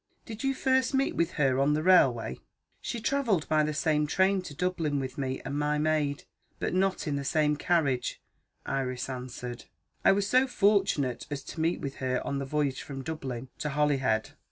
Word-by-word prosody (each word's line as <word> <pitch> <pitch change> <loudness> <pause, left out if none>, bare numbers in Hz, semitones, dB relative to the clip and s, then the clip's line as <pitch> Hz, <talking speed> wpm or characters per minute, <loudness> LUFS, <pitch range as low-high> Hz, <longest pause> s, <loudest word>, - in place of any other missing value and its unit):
Did 220 +1 -7
you 270 0 +1
first 260 0 +2
meet 270 +1 +1
with 170 +1 0
her 135 -4 +2
on 145 +2 +3
the 155 - -1
railway?" 125 - +4 0.4
"She 235 - -4
travelled 230 - +1
by 155 -1 +3
the 150 0 0
same 150 0 +1
train 190 +4 +2
to 165 -6 -9
Dublin, 165 -4 -1
with 130 -1 -4
me 130 -1 -2
and 140 +2 -2
my 150 0 +1
maid, 150 -2 0 0.3
but - - -2
not 190 +1 +1
in 145 -3 -1
the 140 - -3
same 150 +1 +2
carriage," 145 -5 0 0.5
Iris 130 -2 -2
answered; 125 -1 -6 0.4
"I - - +7
was 200 0 +1
so 255 +5 +4
fortunate 195 - +1
as 140 -2 -4
to 160 - -6
meet 165 +2 0
with 140 -2 -5
her 130 -1 0
on 140 - -2
the 140 - -3
voyage 140 -1 -1
from 135 -2 -7
Dublin 130 -5 -5
to 150 - -2
Holyhead. 135 -7 +1
150 Hz, 190 wpm, -29 LUFS, 135-180 Hz, 0.5 s, I